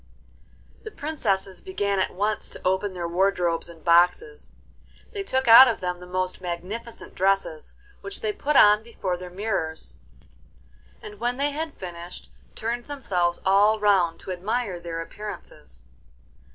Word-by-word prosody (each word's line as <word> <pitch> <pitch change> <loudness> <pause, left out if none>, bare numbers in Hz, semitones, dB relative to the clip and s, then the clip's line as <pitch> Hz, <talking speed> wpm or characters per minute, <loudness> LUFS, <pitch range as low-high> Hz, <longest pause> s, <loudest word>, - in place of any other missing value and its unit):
The 435 - -8
princesses 210 - -2
began 205 - -1
at 190 - +1
once 210 +3 0
to - - -10
open 190 +1 0
their 175 -1 -3
wardrobes 175 -2 0
and 165 -2 -14
boxes. 180 - +2 0.6
They 405 - -4
took 265 -9 -1
out 235 +3 +11
of 235 - -1
them 180 -1 -3
the 180 - -11
most 185 0 -2
magnificent 185 +7 -6
dresses, 190 -5 0 0.3
which 400 0 -7
they 435 -2 -1
put 300 -7 -2
on 210 -3 +7
before 205 -5 -4
their 180 0 -8
mirrors, 180 -4 -3 1.1
and 210 -1 -10
when 245 +2 -1
they 285 +1 0
had 310 +1 -4
finished, 175 -1 -9 0.2
turned 235 +2 -3
themselves 180 -12 -1
all 205 +3 +4
round 190 -5 +2
to - - -6
admire 195 +1 -2
their 165 -1 -5
appearances. 210 +5 -9
195 Hz, 145 wpm, -25 LUFS, 180-235 Hz, 1.1 s, out